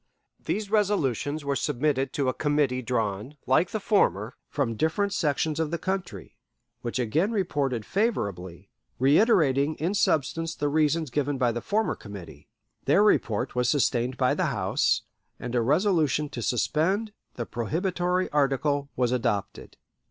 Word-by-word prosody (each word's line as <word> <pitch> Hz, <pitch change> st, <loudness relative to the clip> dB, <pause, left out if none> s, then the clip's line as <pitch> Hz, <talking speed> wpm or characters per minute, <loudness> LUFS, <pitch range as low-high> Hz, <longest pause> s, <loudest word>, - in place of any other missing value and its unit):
These 210 Hz, -1 st, -3 dB
resolutions 155 Hz, -, 0 dB
were 140 Hz, 0 st, 0 dB
submitted 135 Hz, 0 st, 0 dB
to 140 Hz, -2 st, 0 dB
a 130 Hz, -, +1 dB
committee 145 Hz, -4 st, 0 dB
drawn, 115 Hz, +2 st, -2 dB
like 150 Hz, +8 st, +3 dB
the 220 Hz, -, -3 dB
former, 125 Hz, -, +1 dB
from 135 Hz, -6 st, -1 dB
different 160 Hz, -, 0 dB
sections 155 Hz, -2 st, 0 dB
of 160 Hz, -2 st, 0 dB
the 170 Hz, -, -2 dB
country, 180 Hz, -, -5 dB, 0.4 s
which 120 Hz, -, -3 dB
again 140 Hz, -, +1 dB
reported 140 Hz, -, -1 dB
favorably, 100 Hz, -, -2 dB, 0.3 s
reiterating 145 Hz, -, +3 dB
in 170 Hz, +5 st, -1 dB
substance 165 Hz, -2 st, 0 dB
the 145 Hz, -, -1 dB
reasons 155 Hz, -1 st, +1 dB
given 145 Hz, +1 st, -1 dB
by 125 Hz, -2 st, +2 dB
the 120 Hz, +1 st, -4 dB
former 220 Hz, +2 st, 0 dB
committee. 85 Hz, -8 st, -11 dB, 0.4 s
Their 150 Hz, +9 st, +4 dB
report 115 Hz, -, +1 dB
was 125 Hz, -1 st, +1 dB
sustained 125 Hz, -2 st, +1 dB
by -, -, +2 dB
the -, -, 0 dB
House, -, -, +1 dB, 0.4 s
and 125 Hz, -, -5 dB
a 120 Hz, -, +2 dB
resolution 150 Hz, -, +2 dB
to 120 Hz, -, -6 dB
suspend 170 Hz, -, 0 dB, 0.2 s
the 120 Hz, -, -4 dB
prohibitory 180 Hz, -, -1 dB
article 140 Hz, 0 st, +1 dB
was 125 Hz, -1 st, +1 dB
adopted. 115 Hz, -5 st, -2 dB
145 Hz, 145 wpm, -26 LUFS, 125-165 Hz, 0.4 s, Their